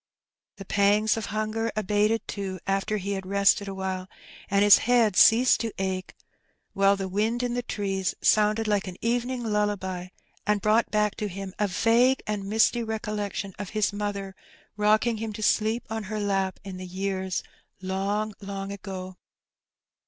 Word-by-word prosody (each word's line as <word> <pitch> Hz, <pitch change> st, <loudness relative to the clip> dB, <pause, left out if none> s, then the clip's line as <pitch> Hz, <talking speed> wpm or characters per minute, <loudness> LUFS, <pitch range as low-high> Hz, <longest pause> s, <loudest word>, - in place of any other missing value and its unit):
The 195 Hz, -, -10 dB
pangs 205 Hz, +2 st, +3 dB
of 225 Hz, -, -4 dB
hunger 215 Hz, +2 st, -2 dB
abated, 210 Hz, +2 st, +1 dB
too, 190 Hz, -2 st, -4 dB
after 195 Hz, +2 st, 0 dB
he 200 Hz, 0 st, -4 dB
had 195 Hz, -1 st, -3 dB
rested 200 Hz, +1 st, +3 dB
awhile, 190 Hz, -1 st, -4 dB, 0.4 s
and 200 Hz, +1 st, +3 dB
his 205 Hz, -1 st, +8 dB
head 235 Hz, -5 st, +3 dB
ceased 240 Hz, +6 st, +6 dB
to 230 Hz, -1 st, -2 dB
ache, 190 Hz, -1 st, -3 dB, 0.6 s
while 195 Hz, 0 st, +4 dB
the 195 Hz, -1 st, -4 dB
wind 220 Hz, +6 st, 0 dB
in 245 Hz, -1 st, -1 dB
the 245 Hz, -, -1 dB
trees 195 Hz, -5 st, -2 dB
sounded 215 Hz, +1 st, +3 dB
like 205 Hz, -2 st, +1 dB
an 180 Hz, -1 st, -7 dB
evening 245 Hz, +2 st, -1 dB
lullaby, 205 Hz, -4 st, -1 dB, 0.4 s
and 210 Hz, 0 st, +1 dB
brought 215 Hz, +3 st, +2 dB
back 210 Hz, -1 st, +1 dB
to 210 Hz, -, -2 dB
him 195 Hz, 0 st, -7 dB
a 210 Hz, -, +2 dB
vague 235 Hz, +7 st, +3 dB
and 205 Hz, -2 st, -3 dB
misty 225 Hz, +2 st, +3 dB
recollection 210 Hz, -3 st, -3 dB
of 205 Hz, -3 st, -5 dB
his 210 Hz, -1 st, +1 dB
mother 200 Hz, -2 st, -4 dB, 0.4 s
rocking 215 Hz, +2 st, +2 dB
him 220 Hz, 0 st, -4 dB
to 215 Hz, +1 st, -6 dB
sleep 220 Hz, +3 st, +1 dB
on 220 Hz, -1 st, -4 dB
her 215 Hz, +2 st, -4 dB
lap, 195 Hz, -2 st, -1 dB
in 195 Hz, -2 st, -7 dB
the 185 Hz, 0 st, -7 dB
years 190 Hz, 0 st, -3 dB, 0.4 s
long, 200 Hz, +3 st, -2 dB
long 195 Hz, 0 st, -5 dB
ago. 185 Hz, -2 st, -7 dB
205 Hz, 160 wpm, -26 LUFS, 195-215 Hz, 0.6 s, his